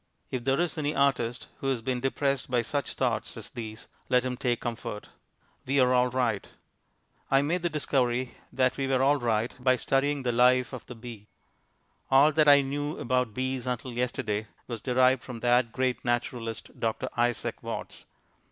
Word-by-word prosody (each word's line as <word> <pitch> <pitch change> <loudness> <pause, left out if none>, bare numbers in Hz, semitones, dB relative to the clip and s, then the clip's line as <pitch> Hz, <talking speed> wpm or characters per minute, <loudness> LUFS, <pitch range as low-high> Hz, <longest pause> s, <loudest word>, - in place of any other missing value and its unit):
If 125 -2 -3
there 135 +2 +2
is 175 -2 0
any 150 0 -1
artist 125 -4 +1
who 135 - -3
has 130 -4 0
been 125 +1 -1
depressed 135 +1 -1
by 125 -1 +2
such 140 +4 -2
thoughts 115 -3 -1
as 110 - -8
these, 110 -2 -7 0.2
let 125 0 +3
him 125 -1 -2
take 120 -2 -1
comfort. 115 -2 -5 0.6
We 140 +1 +2
are 125 -1 +4
all 125 0 +4
right. 120 -5 0 0.8
I 135 +1 +4
made 170 +5 0
the 175 - 0
discovery 130 -5 0 0.2
that 130 0 +1
we 135 -1 -1
were 130 -1 +2
all 145 +2 +4
right 115 -1 0
by 130 0 +5
studying 135 +2 0
the 125 - +1
life 125 +2 +4
of 130 - -8
the 125 - -8
bee. 115 -3 -10 0.8
All 140 +3 +6
that 155 0 +3
I 145 -1 +8
knew 145 +2 -3
about 125 -3 0
bees 130 -1 -2
until 125 0 -3
yesterday 110 -3 -2 0.2
was 115 -3 -6
derived 130 0 +3
from 115 -2 -8
that 120 -1 +3
great 130 0 -1
naturalist, 120 -2 -3
Dr. 110 -1 -1
Isaac 120 -1 0
Watts. - - -6
125 Hz, 180 wpm, -28 LUFS, 120-135 Hz, 0.8 s, I